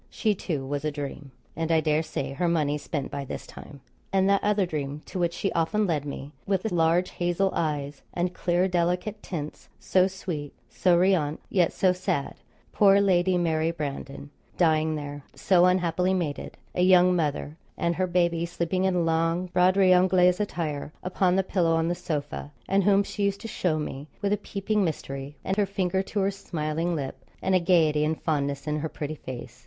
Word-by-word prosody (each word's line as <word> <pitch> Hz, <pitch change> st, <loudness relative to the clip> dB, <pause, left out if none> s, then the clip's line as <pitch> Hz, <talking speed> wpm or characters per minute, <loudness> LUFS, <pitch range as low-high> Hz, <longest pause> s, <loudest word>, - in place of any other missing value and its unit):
She, 215 Hz, -2 st, +1 dB
too, 155 Hz, -8 st, -3 dB
was 140 Hz, +1 st, -3 dB
a 155 Hz, -, +1 dB
dream, 145 Hz, -1 st, -6 dB, 0.3 s
and, 165 Hz, +1 st, -2 dB
I 160 Hz, -, +5 dB
dare 155 Hz, 0 st, +2 dB
say, 140 Hz, -4 st, -4 dB
her 175 Hz, +6 st, 0 dB
money 150 Hz, -3 st, +1 dB
spent 145 Hz, -3 st, -4 dB
by 140 Hz, 0 st, -4 dB
this 135 Hz, -, -6 dB
time. 140 Hz, -2 st, -12 dB, 0.3 s
And 190 Hz, 0 st, +3 dB
that 200 Hz, 0 st, +3 dB
other 205 Hz, -1 st, +2 dB
dream, 150 Hz, -3 st, -4 dB
to 185 Hz, -, -6 dB
which 170 Hz, -1 st, 0 dB
she 195 Hz, -, -1 dB
often 205 Hz, +6 st, +1 dB
led 155 Hz, -6 st, -1 dB
me, 140 Hz, 0 st, -6 dB, 0.2 s
with 195 Hz, -2 st, +1 dB
the 220 Hz, -, -2 dB
large 170 Hz, +2 st, +2 dB
hazel 175 Hz, +2 st, 0 dB
eyes, 145 Hz, -3 st, -2 dB
and 175 Hz, +1 st, -1 dB
clear 180 Hz, +1 st, +1 dB
delicate 180 Hz, +4 st, -1 dB
tints 155 Hz, -4 st, -6 dB
so 185 Hz, 0 st, +3 dB
sweet, 170 Hz, -6 st, -5 dB, 0.2 s
so 180 Hz, -2 st, +3 dB
riante, 170 Hz, -5 st, +2 dB
yet 175 Hz, -4 st, +3 dB
so 185 Hz, -1 st, +2 dB
sad; 180 Hz, -6 st, -2 dB, 0.4 s
poor 200 Hz, -1 st, +5 dB
Lady 185 Hz, -2 st, +3 dB
Mary 160 Hz, -2 st, +1 dB
Brandon, 145 Hz, -3 st, -5 dB, 0.3 s
dying 160 Hz, -2 st, +3 dB
there 145 Hz, -1 st, -6 dB
so 180 Hz, -2 st, +4 dB
unhappily 180 Hz, 0 st, +2 dB
mated 160 Hz, -6 st, -3 dB, 0.2 s
a -, -, 0 dB
young 180 Hz, 0 st, +6 dB
mother, 150 Hz, -2 st, -1 dB, 0.2 s
and 170 Hz, 0 st, 0 dB
her 185 Hz, 0 st, +1 dB
baby 170 Hz, -2 st, +1 dB
sleeping 175 Hz, +2 st, -1 dB
in 180 Hz, -3 st, +2 dB
long 165 Hz, +2 st, +1 dB
'Broderie 185 Hz, +1 st, +4 dB
Anglaise' 180 Hz, 0 st, +4 dB
attire 155 Hz, -8 st, -3 dB
upon 185 Hz, 0 st, +1 dB
the 190 Hz, -, +2 dB
pillow 175 Hz, -3 st, +1 dB
on 165 Hz, 0 st, +1 dB
the -, -, +1 dB
sofa, 145 Hz, -3 st, -4 dB, 0.2 s
and 195 Hz, +1 st, +2 dB
whom 200 Hz, 0 st, +5 dB
she 200 Hz, 0 st, -2 dB
used 200 Hz, 0 st, -1 dB
to -, -, -6 dB
show 180 Hz, -7 st, 0 dB
me 150 Hz, -1 st, -5 dB
with 200 Hz, 0 st, 0 dB
a -, -, +1 dB
peeping 205 Hz, +1 st, -1 dB
mystery, 140 Hz, -4 st, -4 dB
and 190 Hz, -, -1 dB
her 205 Hz, -1 st, +2 dB
finger 190 Hz, -1 st, 0 dB
to 200 Hz, +1 st, -2 dB
her 195 Hz, +1 st, +2 dB
smiling 165 Hz, -3 st, -2 dB
lip, 140 Hz, -4 st, -5 dB, 0.2 s
and 190 Hz, -, 0 dB
a 185 Hz, -, +5 dB
gaiety 160 Hz, -4 st, +3 dB
and 155 Hz, +1 st, -1 dB
fondness 140 Hz, -3 st, -1 dB
in 150 Hz, 0 st, -1 dB
her 160 Hz, +1 st, -3 dB
pretty 150 Hz, 0 st, -5 dB
face. 130 Hz, -, -8 dB
170 Hz, 190 wpm, -26 LUFS, 150-185 Hz, 0.4 s, young